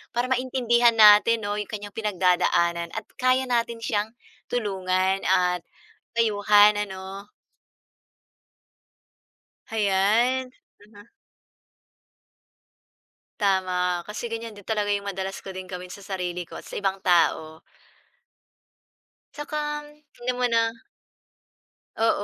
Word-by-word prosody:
para 245 +2 -1
maintindihan 245 -2 +2
natin 220 +1 +6
'no 205 0 -2
'yong 210 - -4
kanyang 205 -2 -7
pinagdadaanan 180 -4 +1
at - - -4 0.2
kaya 255 0 +3
natin 235 -1 -1
siyang 210 -2 0 0.4
tulungan 190 -4 0
at 180 -1 +2 0.6
payuhan 210 -2 +4
ano. 190 +1 -9 2.4
Hayan, 220 +5 +1 0.3
mhm. 205 +1 -17 2.3
Tama, 185 -3 +1
kasi 210 +5 -6
ganyan 225 -2 -6
din 205 - -14
talaga 210 -2 -1
yung 200 0 -1
madalas 190 +1 -5
ko 190 - -7
ding 185 0 -8
gawin 180 -1 -7
sa 200 - -11
sarili 180 -2 -4
ko, 175 - -9
at - - -11
sa - - -12
ibang 195 -1 -1
tao. 160 -3 +2 1.7
Tsaka, 295 +1 -6 0.6
hindi 245 +1 -2
mo 250 - +1
na 230 -1 +2 1.2
Oo, 225 -2 +1
205 Hz, 105 wpm, -25 LUFS, 185-230 Hz, 2.4 s, natin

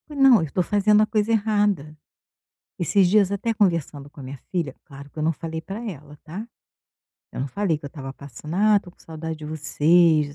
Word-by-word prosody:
Não, 270 - +5
eu 160 -4 -4
tô 185 - +1
fazendo 210 +2 +3
a - - +3
coisa 215 +1 0
errada. 205 -8 +1 0.8
Esses 185 +2 +3
dias 200 0 +3
até 215 +3 -1
conversando 165 -8 0
com 145 - -16
a - - -8
minha 130 +1 -8
filha, 165 -7 -2
claro 140 +1 -12
que - - -22
eu - - -1
não 160 - +2
falei 160 0 -6
para 195 +5 -7
ela, 150 -4 -11
tá. 195 +8 -7 0.9
Eu - - -5
não 135 - -2
falei 190 +1 0
que 145 - -20
eu - - -4
estava 135 -2 -8
passando: 140 +3 -9
"Ah, 210 +2 +4
estou 190 -3 -3
com - - -35
saudade 160 0 -6
de 155 - -9
vocês." 155 0 +2
165 Hz, 210 wpm, -23 LUFS, 150-205 Hz, 0.9 s, Não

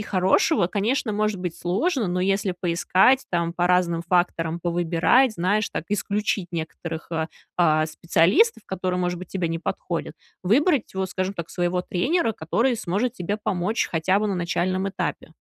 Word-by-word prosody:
хорошего, 185 -3 +2
конечно, 215 +4 0
может 210 -1 0
быть 180 -2 -4
сложно, 215 - 0
но 180 +1 -1
если 195 -1 0
поискать, 185 +9 +3
там, 170 -1 0
по 175 0 0
разным 180 -2 +2
факторам, 170 -1 0
повыбирать, 175 +8 +2
знаешь, 200 +5 +1
так, - - -4
исключить 205 -2 -1
некоторых, 165 0 -6
а, 160 0 -1 0.3
а, 155 -2 +4
специалистов, 170 - +2
которые, 185 -1 -2
может 180 -1 -1
быть, 180 0 -9
тебе 180 -4 -2
не 165 0 -2
подходят, - - -4 0.3
выбрать, 270 - +2
вот, 190 -1 -2
скажем 185 +2 -2
так, 170 -2 -6
своего 180 0 -1
тренера, 245 - 0
который 230 +10 0
сможет 220 +5 -1
тебе 200 0 -3
помочь 205 +1 -1
хотя 180 +4 +2
бы 215 - 0
на 195 - -1
начальном 185 +2 -1
этапе. 195 - -4
185 Hz, 160 wpm, -24 LUFS, 170-210 Hz, 0.3 s, а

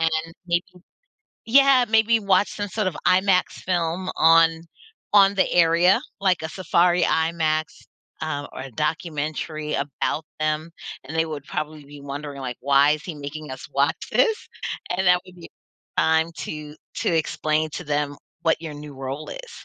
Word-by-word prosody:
And 165 0 +2 0.4
maybe 175 0 +1 0.8
yeah, 270 +1 +6
maybe 220 +1 +4
watch 200 -1 +2
some 205 0 -4
sort 210 +1 -2
of 175 - -3
IMAX 185 0 +3
film 180 0 -1
on 165 0 +5 0.5
on 200 -1 +7
the 190 - +2
area, 170 +2 +4 0.2
like 190 -3 +2
a 160 - -3
safari 180 0 +2
IMAX, 160 -1 +1 0.6
um, 145 -2 -3
or 130 - -7
documentary 155 0 -3
about 145 +2 -2
them. 155 +1 -1 0.4
And 150 +5 -7
they 160 - +3
would 150 -3 -6
probably 155 -1 -5
be 145 0 -12
wondering 140 0 -6
like, 125 -2 -5
"Why 140 +1 +4
is 155 0 -2
he 170 - -6
making 150 +1 -7
us 130 0 -8
watch 140 +2 +2 0.2
this?" 445 -2 +2 0.5
And 190 0 0
that 180 0 +5
would 185 -1 -15
be 170 - -12 0.5
time 160 0 +3
to 150 -1 -6 0.2
to - - 0
explain 155 0 0
to 180 - -5
them 145 -1 -1 0.2
what 165 0 +1
your 160 -2 -6
new 145 0 -9
role 135 +3 -6
is. - - -9
160 Hz, 160 wpm, -23 LUFS, 150-180 Hz, 0.8 s, on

